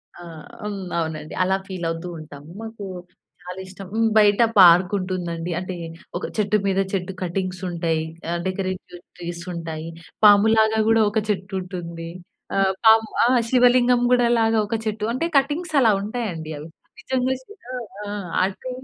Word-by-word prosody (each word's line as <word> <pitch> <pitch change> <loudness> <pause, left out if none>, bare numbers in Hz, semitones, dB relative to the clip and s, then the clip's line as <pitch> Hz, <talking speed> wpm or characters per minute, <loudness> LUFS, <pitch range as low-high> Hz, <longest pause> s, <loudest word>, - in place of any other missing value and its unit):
ఆ! - - -12 0.4
హ్మ్. 205 -2 -4 0.2
అవునండి, 155 -2 -4
అలా 190 +1 +2
ఫీల్ 185 -3 -5
అవుతూ 165 +2 -4
ఉంటాము. 145 -1 -11
మాకు 225 -2 -8 0.6
చాలా 180 +1 -8
ఇష్టం, 185 0 -10 0.3
బయట 205 0 +5 0.2
పార్కుంటుందండి. 180 -1 +4
అంటే 185 0 -5 0.4
ఒక 180 - -4
చెట్టు 210 0 +2
మీద 195 0 +1
చెట్టు 190 0 -2
కటింగ్స్ 185 +1 -3
ఉంటాయి. 165 -2 -1 0.3
ఆ - - 0
డెకరేటివ్ 185 -1 -4 0.2
ట్రీస్ 170 -1 -6
ఉంటాయి. 165 -1 -5 0.4
పాములాగా 220 +1 +5
కూడా 225 0 +5
ఒక 205 - 0
చెట్టు 190 -1 -2
ఉంటుంది. 170 -2 -7 0.5
ఆ - - +1 0.3
పాము 220 0 +7 0.2
ఆ - - +5 0.2
శివలింగం 245 0 +4
కూడా 245 -1 +4
లాగా 225 0 +3
ఒక 225 - -1
చెట్టు 215 0 -2
అంటే 260 +7 -1
కటింగ్స్ 300 +5 0
అలా 225 -3 +5
ఉంటాయండి, 200 -8 -4
అవి 150 +2 -8 0.3
నిజంగా 260 -1 0
శివ 415 +11 -16 0.5
ఆ! - - -4 0.3
అది 195 +7 -3
190 Hz, 145 wpm, -23 LUFS, 175-220 Hz, 0.6 s, పాము